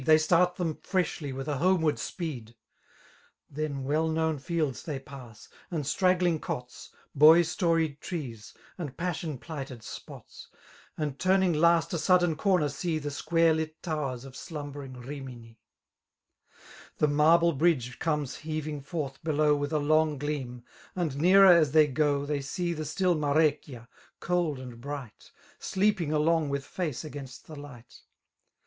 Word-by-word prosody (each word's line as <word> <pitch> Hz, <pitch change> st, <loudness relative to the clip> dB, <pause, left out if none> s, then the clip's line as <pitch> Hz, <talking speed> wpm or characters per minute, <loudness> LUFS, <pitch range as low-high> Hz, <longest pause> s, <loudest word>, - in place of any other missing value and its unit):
They 155 Hz, +3 st, +6 dB
start 175 Hz, +3 st, +3 dB
them 165 Hz, -4 st, -2 dB
freshly 165 Hz, -6 st, -2 dB
with 135 Hz, +2 st, -6 dB
a 145 Hz, -2 st, -1 dB
homeward 165 Hz, -1 st, +2 dB
speed* 125 Hz, -10 st, -5 dB, 1.0 s
llien 145 Hz, -2 st, -3 dB
well 155 Hz, +4 st, +1 dB
known 160 Hz, -1 st, 0 dB
fields 155 Hz, -3 st, -2 dB
they 150 Hz, -4 st, -4 dB
pass, 135 Hz, -5 st, -12 dB, 0.2 s
and 160 Hz, -4 st, -2 dB
stra^ling' 180 Hz, +1 st, +2 dB
COtSy 125 Hz, 0 st, -6 dB, 0.2 s
Boy 155 Hz, +4 st, +7 dB
storied 165 Hz, -3 st, 0 dB
trees, 125 Hz, -, -6 dB, 0.2 s
and 145 Hz, -6 st, -6 dB
passion 165 Hz, -4 st, -3 dB
plighted 135 Hz, -5 st, -8 dB
spots; -, -, -10 dB, 0.5 s
And 145 Hz, -3 st, -3 dB
turning 185 Hz, -1 st, +3 dB
last 170 Hz, +1 st, +3 dB
a 170 Hz, -, 0 dB
sudden 175 Hz, -2 st, +3 dB
corner, 180 Hz, -2 st, +2 dB
see 155 Hz, +4 st, -2 dB
The 145 Hz, -1 st, -4 dB
square 165 Hz, +3 st, +2 dB
lit 155 Hz, 0 st, -3 dB
towers 140 Hz, -7 st, -3 dB
of 135 Hz, -1 st, -11 dB
slumbering 145 Hz, -4 st, -7 dB
Rimini. 125 Hz, -3 st, -9 dB, 1.4 s
The 150 Hz, -, +3 dB
marble 165 Hz, +3 st, +4 dB
bridge 135 Hz, -5 st, +1 dB
comes 150 Hz, -5 st, -1 dB
heaving 155 Hz, -2 st, -4 dB
forth 140 Hz, -1 st, -5 dB
below 150 Hz, -1 st, +2 dB
With 145 Hz, +1 st, -3 dB
a 155 Hz, -, +1 dB
long 155 Hz, 0 st, +2 dB
gleam; 130 Hz, -4 st, -4 dB, 0.3 s
and 170 Hz, -7 st, -1 dB
nearer 180 Hz, +2 st, +7 dB
aA -, -, +5 dB
they 155 Hz, +2 st, +5 dB
go» 145 Hz, 0 st, +1 dB
89 -, -, -5 dB
They 145 Hz, -1 st, -1 dB
see 175 Hz, +5 st, -2 dB
the 155 Hz, -1 st, -5 dB
still 185 Hz, +3 st, +1 dB
Marecchia, 145 Hz, -5 st, 0 dB, 0.3 s
cold 175 Hz, -5 st, 0 dB
and 125 Hz, -2 st, -9 dB
bright. 140 Hz, -5 st, -8 dB, 0.3 s
Sleeping 190 Hz, -5 st, 0 dB
along 155 Hz, 0 st, +2 dB
with 140 Hz, -1 st, -3 dB
face 160 Hz, -4 st, -4 dB
against 140 Hz, -4 st, -9 dB
the 155 Hz, -, -10 dB
light. 140 Hz, -5 st, -12 dB
150 Hz, 145 wpm, -28 LUFS, 140-165 Hz, 1.4 s, Boy